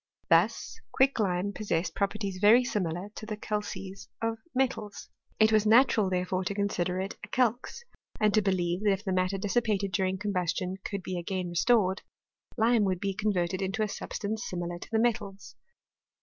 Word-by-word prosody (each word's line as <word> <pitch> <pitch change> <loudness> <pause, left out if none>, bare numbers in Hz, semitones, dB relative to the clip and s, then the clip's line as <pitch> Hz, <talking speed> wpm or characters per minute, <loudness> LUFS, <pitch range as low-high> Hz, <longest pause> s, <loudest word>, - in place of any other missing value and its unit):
Thus - - +2
quicklime 205 -8 +1
possessed 185 -5 -2
properties 200 -1 -2
very 225 +5 +7
similar 185 -5 -2
to 215 - -8
the 215 -1 -4
calces 195 -2 -5
of 225 0 -2 0.2
metals. 245 -6 -2 0.3
It 220 0 +5
was 215 -1 +3
natural, 225 -3 +5
therefore, 185 0 -1
to 200 - -2
consider 185 -3 -1
it 190 +1 -3
as - - -28
a - - -19
calx, 245 - -1 0.4
and 215 -1 +3
to 215 - +4
believe 180 -2 0
that 205 -2 +4
if 195 +1 -4
the 190 -3 -1
matter 185 +1 +1
dissipated 205 -1 0
during 185 +1 0
com 205 +1 -3
bustion 185 +1 -2
could 200 -2 -4
be 185 -1 -3
again 180 +1 -3
restored, 190 +1 +2 0.6
lime 230 -1 +4
would 185 -2 0
be 195 0 -1
con 210 +2 0
verted 180 0 -1
into 195 +3 -1
a - - 0
substance 215 +2 -4
similar 175 -1 -4
to - - -10
the 225 - +1
metals. 220 -4 -1
200 Hz, 180 wpm, -29 LUFS, 185-215 Hz, 0.6 s, very